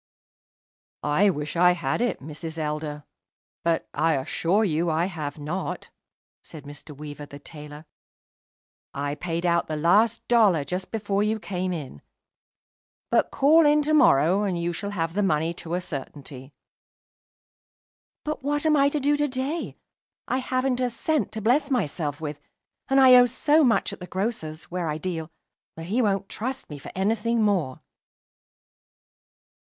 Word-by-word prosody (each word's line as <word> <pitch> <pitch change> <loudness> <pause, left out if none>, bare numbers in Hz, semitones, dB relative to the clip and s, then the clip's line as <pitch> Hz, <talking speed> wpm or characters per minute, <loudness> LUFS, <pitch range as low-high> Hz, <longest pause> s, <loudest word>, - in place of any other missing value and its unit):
"I 150 +8 +3
wish 150 -3 -3
I 180 +1 +5
had 170 +2 -2
it, 245 -3 -1
Mrs. 160 +3 -7
Elder. 150 -1 -3 0.6
But, 170 -1 0
I 160 +2 +2
assure 170 +9 0
you 170 -4 +1
that 165 - +1
I 165 +2 +1
have 160 -6 -5
not," 155 +6 -5 0.5
said 155 -4 -11
Mr. 145 0 -11
Weaver, 145 0 -8
the 140 - -10
tailor. 150 +1 -11 1.1
"I 145 +1 -2
paid 170 +2 -3
out 170 -1 +2
the 155 - -3
last 205 +9 +2
dollar 210 -10 +4
just 180 +5 -4
before 205 -2 -1
you 215 +1 0
came 185 -3 -3
in. 140 - -6 1.1
But - - +3
call 315 +4 +5
in 295 0 +4
to 305 +1 0
morrow, 185 - +5
and 190 -4 -1
you 170 +1 -1
shall 200 +4 -5
have 165 -5 -2
the 205 - 0
money 165 -3 +1
to 170 0 -5
a 180 - -1
certainty." 140 -3 -8 1.7
"But 305 0 -4
what 290 +2 -1
I - - +4
am 280 - +4
to 300 - -1
do 290 +1 +2
to 295 0 +1
day? 270 +5 -3 0.5
I 255 - 0
haven't 255 0 -1
a 250 -1 +1
cent 305 +6 -1
to 220 - -4
bless 275 +6 +2
myself 155 - -1
with; 150 -2 -5 0.5
and 270 0 +3
I 260 -1 +8
owe 245 0 +7
so 295 +6 +3
much 225 -5 +2
at - - -9
the 180 - -8
grocer's, 180 -6 -3
where 175 -2 -2
I 150 - -2
deal, 165 -2 -4 0.5
that 165 - -8
he 215 +8 0
won't 200 -3 0
trust 255 - -5
me 145 - -7
for - - -9
any 195 +4 +2
thing 230 +1 0
more." 175 -10 0
180 Hz, 165 wpm, -25 LUFS, 155-230 Hz, 1.7 s, I